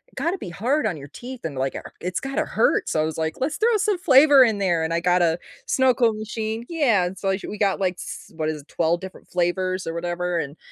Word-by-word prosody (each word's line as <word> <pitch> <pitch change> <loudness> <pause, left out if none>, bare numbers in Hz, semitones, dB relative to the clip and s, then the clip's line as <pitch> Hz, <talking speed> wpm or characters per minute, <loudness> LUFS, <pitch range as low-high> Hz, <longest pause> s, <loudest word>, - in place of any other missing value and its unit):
gotta 350 +3 -1
be 185 - -6
hard 245 - 0
on 180 -7 -3
your 140 -1 -9
teeth," 245 - -9
and, 155 -4 -4
like, 135 0 -2 0.3
"It's 180 +1 -2
gotta 270 0 -2
hurt." - - +1
So, - - 0
I - - +2
was, 160 -1 -4
like, 160 0 -1
"Let's 295 +4 -1
throw 455 0 +3
some 415 -2 0
flavor 280 -3 +7
in 225 -4 +2
there," 180 -4 +1
and 160 - -2
I 170 - +2
got 180 +1 +3
a 165 -1 +2 0.3
snow 260 -1 +3
cone 230 -3 +2
machine. 220 +1 -4
Yeah. 235 - +2
So, 195 +1 -2
we 190 - +1
sh - - -9
we 210 - -6
got 200 -2 +1
like, 185 -2 0
s - - -8
what 155 -1 -1
is 155 -1 -4
it, - - -33
12 170 +1 0
different 190 0 -10
flavors, 185 +1 0
or 165 - -3
whatever. 175 +1 -2
And 145 0 -5
190 Hz, 250 wpm, -23 LUFS, 170-250 Hz, 0.3 s, flavor